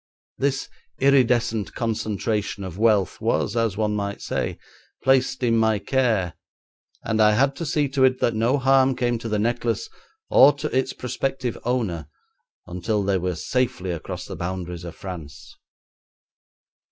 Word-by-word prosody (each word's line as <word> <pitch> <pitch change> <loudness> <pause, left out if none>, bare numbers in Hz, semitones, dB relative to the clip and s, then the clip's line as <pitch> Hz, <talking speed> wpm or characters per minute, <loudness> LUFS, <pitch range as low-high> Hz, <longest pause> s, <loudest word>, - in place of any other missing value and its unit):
This 135 0 0 0.3
iridescent 120 -6 +2
concentration 110 -2 -2
of 95 0 -7
wealth 105 -5 +2
was, 115 +1 0
as 115 -4 0
one 105 -1 0
might 100 -1 -3
say, - - -3 0.5
placed 130 -1 +2
in 115 -1 +3
my 110 -1 +3
care, 105 -5 0 0.7
and 110 0 0
I 105 0 +6
had 135 +5 +2
to 165 - -4
see 145 0 +1
to 135 0 +1
it 130 0 +2
that 120 - +2
no 115 +5 +2
harm 135 -1 +4
came 120 -2 0
to 115 - -5
the 105 - 0
necklace 115 0 -1 0.4
or 140 +3 +7
to 145 0 -4
its 130 0 +1
prospective 130 0 -3
owner 105 - -1 0.6
until 100 +4 -2
they 95 -1 +1
were 90 0 -2
safely 120 -1 -1
across 85 -3 -5
the - - -7
boundaries 90 -1 -5
of 85 - -8
France. 85 -7 -9
115 Hz, 150 wpm, -23 LUFS, 100-130 Hz, 0.7 s, or